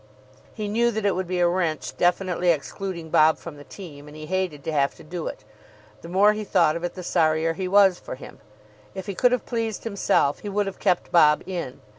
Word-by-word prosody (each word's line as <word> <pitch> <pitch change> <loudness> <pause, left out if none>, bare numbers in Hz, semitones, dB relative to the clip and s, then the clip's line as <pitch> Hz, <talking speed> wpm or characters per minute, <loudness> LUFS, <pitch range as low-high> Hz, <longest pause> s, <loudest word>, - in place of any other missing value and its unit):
He 215 -2 -4
knew 235 +3 +2
that 220 -2 -3
it 200 - +3
would 185 0 -3
be 180 0 -2
a 175 - +5
wrench 170 -3 -1
definitely 180 0 +1
excluding 170 +1 -3
Bob 155 +1 +5
from 165 -3 -10
the 145 - -11
team, 150 -5 -11
and 150 +1 -11
he 155 - -8
hated 180 -4 -2
to - - -3
have 140 -2 +1
to - - -14
do 165 +1 -5
it. - - -7 0.6
The 165 - -10
more 200 +4 +4
he 215 0 -4
thought 155 -5 +2
of 170 - -5
it, 175 - -3
the 185 - -7
sorrier 160 0 +1
he 185 +2 -4
was 195 -1 +5
for - - -7
him. - - -12 0.6
If 190 - -6
he 200 - -4
could 245 +6 +3
have 250 - 0
pleased 225 -3 -3
himself, 200 -9 +1
he 205 - -6
would 205 +1 0
have 195 -1 -6
kept 185 -4 0
Bob 150 -3 +5
In. 170 -9 -5
180 Hz, 230 wpm, -24 LUFS, 160-200 Hz, 0.6 s, a